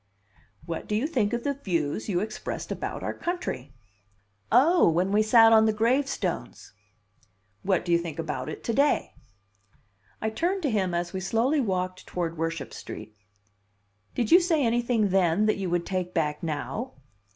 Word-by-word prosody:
"What 165 -1 -5
do 210 - -1
you 225 +6 +1
think 245 -10 0
of 240 0 -2
the 285 - 0
views 180 - -2
you 180 -2 +1
expressed 215 +1 -5
about - - -4
our - - -2
country?" 340 - -4 0.8
"Oh! 325 - +5
When 180 +4 +1
we 210 +1 +4
sat 225 +1 +6
on 220 0 +6
the 220 - +2
gravestones." 230 -3 -1 0.9
"What 190 -3 0
do 175 - -2
you 170 - +5
think 165 -3 -6
about 145 -6 -4
it - - -7
to 230 - -1
day?" 285 +5 +2 1.1
I 220 - -2
turned 360 - -1
to 285 - +1
him 190 -5 0
as 175 0 -2
we 190 - -2
slowly 230 +10 +1
walked 185 -4 -2
toward 170 -2 -3
Worship 165 -2 -3
Street. 110 0 -9 1.0
"Did 235 -3 -1
you 350 - +9
say 330 -6 +1
anything 235 -2 +1
then 190 +1 +3
that 215 - +2
you 190 -2 -3
would 175 0 0
take 185 -2 -3
back 150 -3 0
now?" 170 - -4
205 Hz, 170 wpm, -26 LUFS, 170-240 Hz, 1.1 s, you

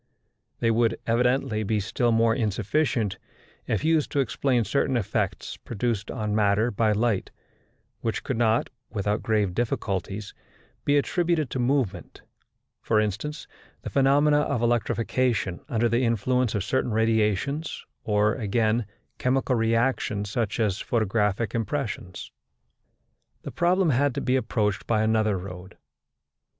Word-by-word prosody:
They 115 - +3
would, 115 0 +1
evidently, 125 0 +1
be 110 0 0
still 120 +4 0
more 115 0 +3
insufficient 110 0 0 0.5
if - - -1
used 160 -2 +2
to 145 - +1
explain 130 -2 +1
certain 130 +4 +1
effects 110 - -2
produced 115 -2 -3
on 105 -1 -2
matter 105 +2 +2
by 110 +1 +2
light, 105 -2 0 0.7
which 115 - -2
could 130 - -2
not, 115 -1 +1 0.2
without 105 0 -1
grave 105 -4 +1
difficulties, 100 -2 -2 0.5
be 145 0 +4
attributed 165 -1 0
to 130 - -2
movement; 120 -8 -1 0.6
for 110 - +2
instance, 110 +9 -3 0.4
the - - -5
phenomena 145 +2 +4
of 125 -5 0
electrification 115 -3 0
under 120 0 +2
the 115 +2 +1
influence 120 +1 +1
of 100 - 0
certain 130 +2 0
radiations, 110 - 0 0.2
or, 105 0 +2
again, 110 -1 0 0.3
chemical 130 +1 +1
reactions 115 -3 0
such 110 -1 -1
as 105 -3 +1
photographic 110 -1 0
impressions. 115 -5 -4 1.1
The - - -6
problem 175 -1 +2
had 140 +1 +2
to - - -2
be 130 - +1
approached 105 -6 -1
by 110 -2 +2
another 110 -2 +2
road. 90 0 -9
115 Hz, 130 wpm, -26 LUFS, 105-130 Hz, 1.1 s, be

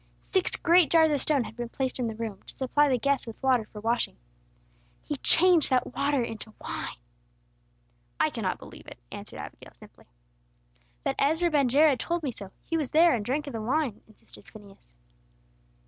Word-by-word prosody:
Six 375 -2 0
great 345 -1 +4
jars 320 -2 +5
of 285 -3 +1
stone 290 -5 +2
had 225 - -9
been 240 0 -5
placed 260 +1 -3
in 245 - 0
the 220 - -4
room, 220 -3 -5
to - - -8
supply 290 +2 +2
the 255 - +2
guests 275 0 0
with 225 - -7
water 255 -4 +3
for 210 - -11
washing. 230 +2 -1 0.9
He 295 - -3
changed 350 +3 +4
that 255 -2 +1
water 280 -1 +1
into 220 -1 -7
wine!" - - -5 1.2
"I - - +2
cannot - - -2
believe - - -13
it!" - - -10
answered - - -9
Abigail, - - -10
simply. - - -17 1.0
"But 270 - -1
Ezra 320 +4 +2
ben 280 -4 +3
Jared 285 +1 +4
told 340 -1 -2
me 275 - -1
so. 200 -4 -9 0.2
He 330 - -1
was 295 -5 -2
there, 330 +1 +5
and 225 -4 -1
drank 280 +7 -1
of 280 - -7
the 225 - -4
wine," 255 -1 -1
insisted 215 - -17
Phineas. 200 - -16
265 Hz, 185 wpm, -27 LUFS, 230-305 Hz, 1.2 s, jars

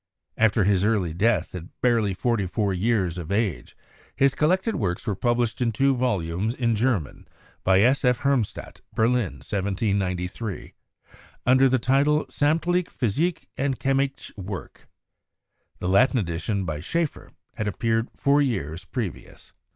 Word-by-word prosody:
After 110 -1 +3
his 95 -1 +2
early 100 -7 +1
death 100 -1 +1
at 90 -2 -9
barely 115 -6 +2
forty 110 -2 0
four 100 +1 -1
years 95 -3 0
of 85 +1 -6
age, 100 - -1 0.4
his 140 0 +3
collected 185 +10 +1
works 90 -2 -2
were 105 - 0
published 120 +3 0
in 120 -2 +2
two 135 +4 +2
volumes 105 -3 -1
in 115 -3 +1
German 110 - -1 0.4
by 95 +1 +4
S. 130 +6 +3
F. 125 -2 +2
Hermbstadt 135 -6 -1
(Berlin, 110 - +1
1793), 95 0 -2 0.7
under 130 +1 +5
the 130 - +3
title 140 +5 +2
'Sammtliche 165 +4 +1
Physische 150 - -1
und 135 -1 0
Chemische 135 0 -1
Werke.' 95 -5 -8 0.9
The 90 - -4
Latin 100 +8 +4
edition 95 +1 -2
by 75 -3 -3
Schaefer 165 - -2 0.2
had 110 - -3
appeared 115 +3 0
four 140 +1 +3
years 95 - -2
previous. 110 -4 -6
110 Hz, 135 wpm, -25 LUFS, 95-130 Hz, 0.9 s, under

